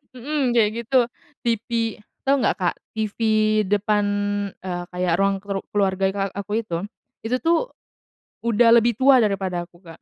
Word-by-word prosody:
hmm, 290 +4 -3
kayak 215 -3 +4
gitu. 250 0 +3 0.4
TV 230 0 -1 0.6
tau 275 +1 +4
nggak - - +1
Kak, 180 -3 0 0.2
TV 215 -2 -2 0.5
depan, 210 0 +2 0.6
eee, 175 -1 -3
kayak 180 -1 0
ruang 195 0 +2
kru 195 -1 -4
keluarga 195 -1 +1
ika 195 0 -3
aku 205 +2 -2
itu, 170 -5 -3 0.4
itu 245 +3 0
tuh, 340 +9 +1 0.8
udah 235 +1 +4
lebih 235 -1 +1
tua 265 -1 +6
daripada 190 -5 -1
aku, 175 -1 -22
Kak. 165 -1 -13
205 Hz, 150 wpm, -23 LUFS, 190-235 Hz, 0.8 s, tua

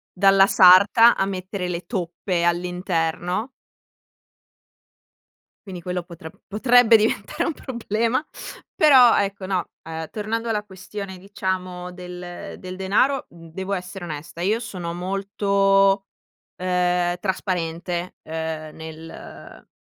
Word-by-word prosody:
dalla 195 0 +6
sarta 200 +5 +7
a 195 - +1
mettere 190 -1 -4
le 175 -1 -3
toppe 175 -3 -2
all'interno. 180 +3 -1 2.2
Quindi 185 -3 -7
quello 180 0 -3
potre 170 -2 -10 0.2
potrebbe 235 +2 +5
diventare 215 +8 -1
un 330 - -1
problema; 235 -1 -1 0.5
però 260 -6 +7
ecco, 200 -1 -1
no, 185 -2 -2
ehm, 160 -1 -6
tornando 225 +2 -3
alla 210 -1 -1
questione 190 0 -8
diciamo 185 -2 -4
del 180 -1 -8
del 185 0 -7
denaro, 210 +9 +1
mhmm, 165 -1 -14
devo 190 +2 -5
essere 185 0 -4
onesta, 160 0 -7
io 210 +5 +1
sono 180 -8 -6
molto, 195 +1 +1 0.5
ehm, 180 -1 +1
trasparente, 175 -2 -3
ehm, 160 -1 -5
nel 160 0 -11
185 Hz, 110 wpm, -23 LUFS, 175-200 Hz, 2.2 s, sarta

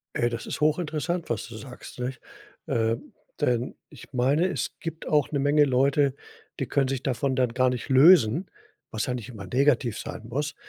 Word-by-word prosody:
Ey, 120 - +2
das 120 - -5
ist - - -4
hoch 155 +2 +3
interessant, 170 +1 -3
was 115 -4 -2
du 115 - -10
sagst, 125 +1 -10
nicht? 125 0 -4 0.5
Ähm, 115 0 -1 0.3
denn 125 0 0
ich - - -14
meine, 135 +7 +2
es 185 - -2
gibt 165 -1 -6
auch 150 -3 +2
eine 145 - -1
Menge 145 +2 +4
Leute, 135 +1 +2 0.4
die - - 0
können 135 -2 +1
sich 135 -1 -3
davon 130 +1 0
dann 125 -3 +1
gar 130 0 +3
nicht 125 +2 -4
lösen, 145 - +6 0.4
was 110 -2 -2
ja 125 - -2
nicht 125 -1 -6
immer 105 -5 -8
negativ 125 +1 +1
sein 110 - -7
muss. 145 +5 -3
130 Hz, 190 wpm, -26 LUFS, 120-150 Hz, 0.5 s, lösen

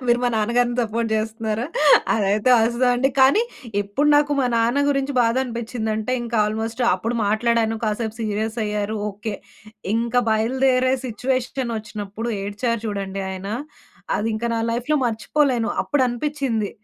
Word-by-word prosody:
మీరు 240 0 +4
మా 245 - +3
నాన్న 220 +1 0
గారిని 245 0 +2
సపోర్ట్ 230 0 -1
జేస్తున్నారా? 220 +1 -2 0.5
అదైతే 210 +3 +2
అస్స 235 +2 0
అండి. 255 +2 +2
కానీ 275 - +6 0.4
ఇప్పుడు 205 +9 0
నాకు 290 0 +3
మా 255 - +2
నాన్న 235 +5 +2
గురించి 275 0 0
బాధనిపించిందంటే, 230 -2 -1
ఇంక 235 0 -5
ఆల్‌మోస్ట్ 220 +3 -3
అప్పుడు 225 +6 -3
మాట్లాడాను 225 +1 +1
కాసేపు 215 +1 -2
సీరియస్ 220 +1 -2
అయ్యారు. 210 0 -2 0.2
ఓకే. 205 +1 -5 0.6
ఇంక 235 +1 -1
బయలుదేరే 255 +3 +2
సిట్యుయేషనొచ్చినప్పుడు 230 -4 -3
ఏడ్చారు 215 +3 -2
చూడండి 195 -2 -3
ఆయన, 190 +1 -6 0.7
అదింక 220 +1 -2
నా 225 - 0
లైఫ్‌లో 245 +6 0
మర్చిపోలేను. 240 +1 0
అప్పుడనిపించింది 255 -4 -1
230 Hz, 125 wpm, -22 LUFS, 215-250 Hz, 0.7 s, కానీ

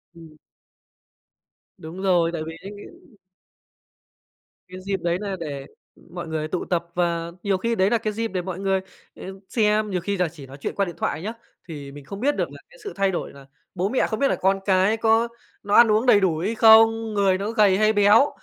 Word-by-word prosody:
Ừm. 160 -2 -15 1.4
Đúng 175 +2 -9
rồi, 175 -3 +2
tại 160 - -3
vì 165 0 -8
đấy 200 - -8 2.0
Cái 185 0 -10
dịp 195 -1 -2
đấy 170 0 0
là 200 -2 -3
để 140 -4 -6 0.5
mọi 175 -2 -6
người 155 -1 -3
tụ 180 - -3
tập 170 -2 -1
và 170 -1 -1
nhiều 195 -2 +1
khi 230 +4 -1
đấy 190 0 +2
nà 235 - +2
cái 215 -1 -3
dịp 225 +1 -2
để 185 -3 -3
mọi 185 0 -6
người, 195 -1 0 0.4
ờ, - - -11 0.3
xem. 215 -2 +1
Nhiều 180 -3 -2
khi 200 +2 -2
là 180 -2 +1
chỉ 150 -4 -12
nói 135 +2 -12
chuyện - - -4
qua 200 - +1
điện 175 - -7
thoại 155 - -2
nhá, 220 +4 -4 0.3
thì 145 -4 -8
mình 145 -1 -12
không 200 +5 -8
biết 285 +4 +1
được - - -2
là - - -12
cái - - -18
sự 410 - -6
thay 195 -1 +1
đổi 175 - -5
là 140 -1 -14 0.3
bố 185 +3 -1
mẹ 260 - +1
không 220 - -4
biết 280 - +3
là - - +1
con 195 +1 +1
cái 195 +3 +2
có 225 +1 +2 0.4
nó 205 0 0
ăn 235 -2 +7
uống 220 +4 +2
đầy 215 -5 +6
đủ 175 -5 +1
hay 205 +8 -2
không, 225 0 +5
người 195 -2 +2
nó 205 +3 -3
gầy 205 -4 +3
hay 215 +1 +3
béo. 210 +7 +5
195 Hz, 220 wpm, -23 LUFS, 170-215 Hz, 2.0 s, ăn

